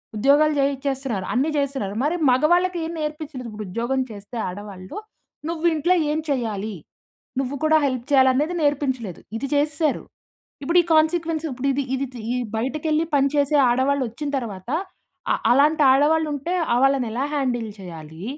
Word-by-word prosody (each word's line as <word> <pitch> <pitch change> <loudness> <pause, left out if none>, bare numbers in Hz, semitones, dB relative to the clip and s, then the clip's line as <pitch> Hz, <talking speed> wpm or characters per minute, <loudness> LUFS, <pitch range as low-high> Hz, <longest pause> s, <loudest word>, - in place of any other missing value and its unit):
ఉద్యోగాలు 290 +7 +4
చేయిచ్చేస్తున్నారు, 270 -6 -1
అన్ని 270 +5 +1
చేస్తున్నారు. 270 -8 -2
మరి 305 +4 +1
మగవాళ్ళకి 345 +8 +3
ఏం 325 - -4
నేర్పించలేదు. 300 -4 -5
ఇప్పుడు 215 -1 -7
ఉద్యోగం 235 +7 -1
చేస్తే 210 +3 -9
ఆడవాళ్ళు. 190 0 -8 0.5
నువ్వు 335 0 -3
ఇంట్లో 330 +4 +2 0.2
ఏం 305 - 0
చెయ్యాలి? 220 -6 -2 0.7
నువ్వు 270 +1 -2
కూడా 315 0 +5
హెల్ప్ 255 -3 -2
చేయాలి 265 -2 +6
అనేది 300 +6 0
నేర్పించలేదు. 260 - -1 0.2
ఇది 275 - -3
చేసేసారు. 295 +1 0 0.6
ఇప్పుడు 335 +6 +2
ఈ - - -6
కాన్సీక్వెన్స్ 320 0 +2
ఇప్పుడు 260 +2 -3
ఇది 280 +1 0
ఇది 270 +1 -2
తి 245 - -8
ఈ - - -1 0.2
బయటకెళ్ళి 305 +6 0
పని 275 -1 +4
చేసే 290 +1 +2
ఆడవాళ్ళు 265 +3 +2
వచ్చిన 285 +6 -5
తరువాత. 210 -6 -6 0.6
అ - - +3 0.2
అలాంటి 295 +4 +4
ఆడవాళ్ళు 305 +4 +3
ఉంటే 285 +6 -3 0.2
ఆహ్, 240 - +3
వాళ్ళని 270 -2 +3
ఎలా 250 +5 -1
హ్యాండిల్ 245 -6 -1
చేయాలి? 165 -2 -10
275 Hz, 155 wpm, -23 LUFS, 240-305 Hz, 0.7 s, చేయాలి